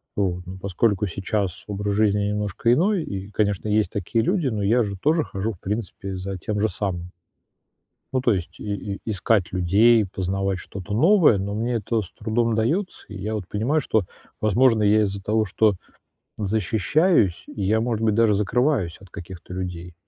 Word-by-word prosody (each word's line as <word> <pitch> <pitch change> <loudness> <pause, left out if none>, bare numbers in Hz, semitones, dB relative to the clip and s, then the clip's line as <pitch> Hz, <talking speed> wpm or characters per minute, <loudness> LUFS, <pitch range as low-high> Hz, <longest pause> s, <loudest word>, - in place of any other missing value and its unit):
Вот. 90 -3 -1
Но 95 +1 -8
поскольку 100 +2 0
сейчас 95 0 -2
образ 100 0 -2
жизни 105 0 +2
немножко 105 +2 +1
иной, 185 +5 +2
и, 100 -3 -6
конечно, 105 -1 0
есть 105 0 +2
такие 105 +4 -1
люди, 180 - +1
но 110 -5 -1
я 115 +5 +3
же 100 -2 -4
тоже 155 +1 +3
хожу, 105 0 -3
в 90 - -17
принципе, 100 -2 -4
за 95 +1 -5
тем 105 +3 -3
же 110 - +3
самым. 90 -3 -4 1.0
Ну, 130 - +1
то 120 -3 +3
есть, 90 -2 -5
и 105 -1 -3 0.2
и - - -11
искать 105 -2 +1
людей, 105 +5 +4
познавать 95 0 -2
что-то 100 +2 -7
новое, 160 - +5
но 100 +1 -3
мне 115 +3 -1
это 115 +1 0
с 95 - -10
трудом 115 +2 -1
удаётся. 150 - -1
И 105 - -8
я 105 +3 -3
вот 105 -5 -4
понимаю, 130 +10 0
что, 110 -7 +1 0.4
возможно, 110 +1 +4
я 105 +1 +4
из-за 100 -1 -3
того, 110 +3 +1
что 105 +1 +2 0.6
защищаюсь, 110 - +2
я, 105 +2 0
может 115 -2 -1
быть, 110 -2 +3
даже 115 -2 +4
закрываюсь 105 - +1
от 100 - -15
каких-то 90 +1 -9
людей. 90 -1 -5
105 Hz, 175 wpm, -23 LUFS, 95-115 Hz, 1.0 s, новое